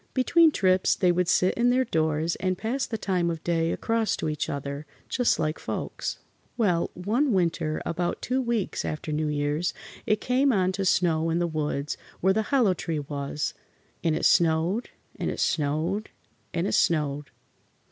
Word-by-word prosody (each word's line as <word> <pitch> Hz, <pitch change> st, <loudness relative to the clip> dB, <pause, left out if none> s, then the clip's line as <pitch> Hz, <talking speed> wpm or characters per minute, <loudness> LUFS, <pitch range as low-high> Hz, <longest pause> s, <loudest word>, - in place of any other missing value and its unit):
Between 325 Hz, +5 st, +5 dB
trips 185 Hz, -9 st, +2 dB
they 180 Hz, -2 st, +3 dB
would 180 Hz, 0 st, +1 dB
sit 185 Hz, +2 st, +3 dB
in 240 Hz, +1 st, +2 dB
their 255 Hz, +1 st, +3 dB
doors 160 Hz, -3 st, 0 dB
and 185 Hz, -1 st, -1 dB
pass 245 Hz, +7 st, -2 dB
the 225 Hz, -, -3 dB
time 180 Hz, -5 st, 0 dB
of 165 Hz, -1 st, -4 dB
day 165 Hz, -1 st, +1 dB
across 225 Hz, -2 st, 0 dB
to -, -, -2 dB
each 150 Hz, -1 st, -2 dB
other, 140 Hz, +1 st, -5 dB, 0.2 s
just 245 Hz, -2 st, +2 dB
like 155 Hz, +1 st, -1 dB
folks. -, -, -4 dB, 0.4 s
Well, 180 Hz, -8 st, +2 dB
one 230 Hz, +10 st, +1 dB
winter, 170 Hz, -4 st, 0 dB
about 175 Hz, +1 st, -2 dB
two 260 Hz, +1 st, -1 dB
weeks 235 Hz, -5 st, -1 dB
after 155 Hz, 0 st, -4 dB
New 155 Hz, +1 st, 0 dB
Year's, 150 Hz, +3 st, -1 dB, 0.3 s
it 215 Hz, 0 st, +2 dB
came 260 Hz, +4 st, +2 dB
on 185 Hz, -4 st, +2 dB
to 195 Hz, +1 st, -2 dB
snow 165 Hz, -3 st, +2 dB
in 165 Hz, -, +1 dB
the 175 Hz, -, +1 dB
woods 150 Hz, -3 st, -2 dB, 0.2 s
where 190 Hz, +2 st, +3 dB
the 220 Hz, -, +1 dB
hollow 250 Hz, -9 st, +4 dB
tree 165 Hz, -2 st, -3 dB
was, 145 Hz, 0 st, -3 dB, 0.5 s
and 160 Hz, -2 st, +2 dB
it -, -, -1 dB
snowed, 170 Hz, +7 st, +3 dB, 0.3 s
and -, -, -2 dB
it -, -, -4 dB
snowed, 160 Hz, +8 st, 0 dB, 0.4 s
and 170 Hz, -, -1 dB
it -, -, -1 dB
snowed. 150 Hz, -3 st, +1 dB
175 Hz, 175 wpm, -26 LUFS, 155-215 Hz, 0.5 s, Between